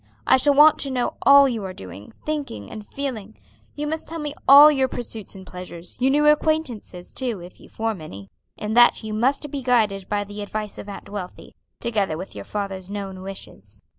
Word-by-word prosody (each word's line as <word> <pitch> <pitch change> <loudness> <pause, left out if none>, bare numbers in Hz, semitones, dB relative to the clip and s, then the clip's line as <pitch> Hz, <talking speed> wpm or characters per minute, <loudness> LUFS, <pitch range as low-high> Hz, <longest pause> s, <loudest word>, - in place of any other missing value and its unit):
I - - +6
shall 280 +2 +3
want 300 +2 +7
to 275 - 0
know 250 -2 -1
all 280 0 +8
you 230 -5 -3
are 190 -1 -5
doing, 95 +2 -10
thinking, 295 -6 -4
and 215 -1 -7
feeling. 220 -4 -6 0.4
You 295 - -3
must 315 +2 -4
tell 330 - -5
me 295 -2 -3
of - - -22
all 285 +3 +10
your 265 -3 +2
pursuits 225 -6 -7
and 190 -1 -11
pleasures; 180 -1 -7
your 260 +1 +3
new 295 +2 +3
acquaintances, 300 - 0
too, 245 -6 -3
if 175 +1 -12
you - - -16
form 220 -5 -3
any. 100 -9 -10 0.3
In 210 +1 -3
that 240 0 +5
you 215 0 -5
must 265 +6 0
be 280 - -4
guided 215 -6 +1
by 205 0 0
the 205 +1 -8
advice 210 0 -5
of 205 - -8
Aunt 200 - -9
Wealthy, 200 -3 -8 0.3
together 205 -8 -1
with 185 +3 -8
your - - -8
father's 195 -2 -5
known 195 -2 -6
wishes. 105 - -9
220 Hz, 205 wpm, -23 LUFS, 195-275 Hz, 0.4 s, all